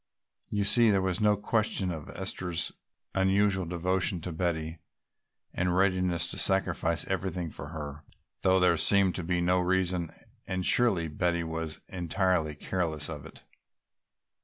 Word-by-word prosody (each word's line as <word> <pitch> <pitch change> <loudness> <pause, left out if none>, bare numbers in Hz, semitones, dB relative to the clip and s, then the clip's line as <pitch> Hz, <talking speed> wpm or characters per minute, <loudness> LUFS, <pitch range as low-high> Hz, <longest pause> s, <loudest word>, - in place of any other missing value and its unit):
You 105 -1 0
see 115 +3 +5
there 100 -2 +3
was 95 +1 -1
no 105 -1 +3
question 105 -3 0
of 80 -3 -7
Esther's 85 -1 -3 0.4
unusual 95 0 +2
devotion 90 +2 0
to 90 - -5
Betty 80 -1 -2 0.7
and 90 0 0
readiness 90 -2 +2
to - - -4
sacrifice 90 -3 +1
everything 95 -3 -3
for 70 - -8
her, 75 -2 -7 0.4
though 95 0 +3
there 90 -2 +3
seemed 100 +1 +5
to 90 - -4
be 90 +1 -1
no 90 +1 +2
reason, 90 -2 0 0.4
and 95 -1 -2
surely 100 -9 +3
Betty 85 +2 -1
was 80 -1 -5
entirely 90 -3 -1
careless 80 -2 -2
of 75 -3 -8
it. - - -16
90 Hz, 140 wpm, -29 LUFS, 85-95 Hz, 0.7 s, see